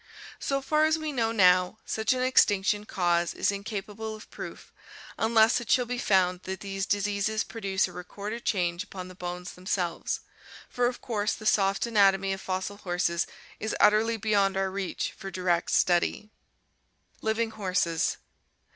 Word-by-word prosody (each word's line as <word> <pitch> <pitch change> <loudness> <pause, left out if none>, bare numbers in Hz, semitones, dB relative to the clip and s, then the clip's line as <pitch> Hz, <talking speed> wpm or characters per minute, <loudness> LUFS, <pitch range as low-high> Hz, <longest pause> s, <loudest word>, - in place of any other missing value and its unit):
So 275 -1 -1
far 305 +2 +3
as 315 +1 +3
we 310 -1 -3
know 230 -5 0
now 185 -2 +4
such 220 -1 0
an 255 0 +1
extinction 210 -5 +3
cause 175 -2 +1
is - - +1
in 200 0 -5
capable 215 +1 -5
of 215 - -13
proof, - - -9 0.4
unless 225 +1 +4
it 235 - -9
shall 250 -1 +4
be 245 +1 -3
found 185 -5 +2
that 190 0 -5
these 195 -1 -3
diseases 205 +2 0
produce 195 -5 -1
a - - -11
recorded 205 +6 -6
change 175 -2 0
upon 185 -2 -8
the - - -10
bones 180 0 -6
themselves, 180 -2 -2 0.5
for 245 -1 +1
of 245 - -4
course 215 -3 -1
the 215 - -9
soft 195 -1 +2
anatomy 195 -4 +3
of 190 - -6
fossil 190 +2 -3
horses 175 -3 -1 0.3
is 220 - -2
utterly 220 +2 +4
beyond 200 -2 +2
our 195 0 0
reach 195 -1 -3
for 195 -2 -8
direct 180 -2 0
study. 180 +4 +2 0.9
Living 220 +1 0
Horses. 185 -5 0
200 Hz, 160 wpm, -28 LUFS, 185-220 Hz, 0.9 s, now